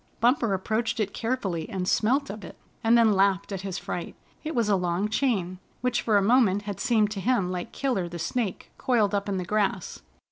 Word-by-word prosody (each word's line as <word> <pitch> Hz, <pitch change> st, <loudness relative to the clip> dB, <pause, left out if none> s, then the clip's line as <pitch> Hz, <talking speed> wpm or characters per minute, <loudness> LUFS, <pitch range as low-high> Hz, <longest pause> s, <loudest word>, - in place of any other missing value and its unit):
Bumper 235 Hz, -3 st, +3 dB
approached 220 Hz, +5 st, -1 dB
it 215 Hz, -, -1 dB
carefully 220 Hz, -9 st, -2 dB
and 185 Hz, -2 st, -3 dB
smelt 265 Hz, +7 st, +2 dB
of 210 Hz, 0 st, -9 dB
it, -, -, -10 dB, 0.3 s
and 230 Hz, +1 st, +5 dB
then 225 Hz, -2 st, +5 dB
laughed 195 Hz, 0 st, +2 dB
at 195 Hz, -2 st, -3 dB
his 195 Hz, -2 st, -4 dB
fright. 175 Hz, -, -5 dB, 0.3 s
It 315 Hz, -1 st, -4 dB
was 230 Hz, -3 st, +2 dB
a 205 Hz, -, +3 dB
long 180 Hz, +2 st, 0 dB
chain, 200 Hz, -7 st, 0 dB, 0.2 s
which 250 Hz, 0 st, +1 dB
for 215 Hz, -3 st, +3 dB
a 200 Hz, -, +3 dB
moment 205 Hz, -3 st, +3 dB
had 205 Hz, -2 st, -5 dB
seemed 220 Hz, -5 st, +2 dB
to 205 Hz, -, -4 dB
him 200 Hz, -6 st, +1 dB
like 180 Hz, -1 st, -4 dB
Killer 240 Hz, -11 st, -1 dB
the 170 Hz, -, -6 dB
Snake 200 Hz, +4 st, -3 dB
coiled 220 Hz, -5 st, +2 dB
up 200 Hz, 0 st, -1 dB
in 195 Hz, -, -1 dB
the 180 Hz, -, -3 dB
grass. 200 Hz, -2 st, -1 dB
205 Hz, 210 wpm, -26 LUFS, 190-235 Hz, 0.3 s, and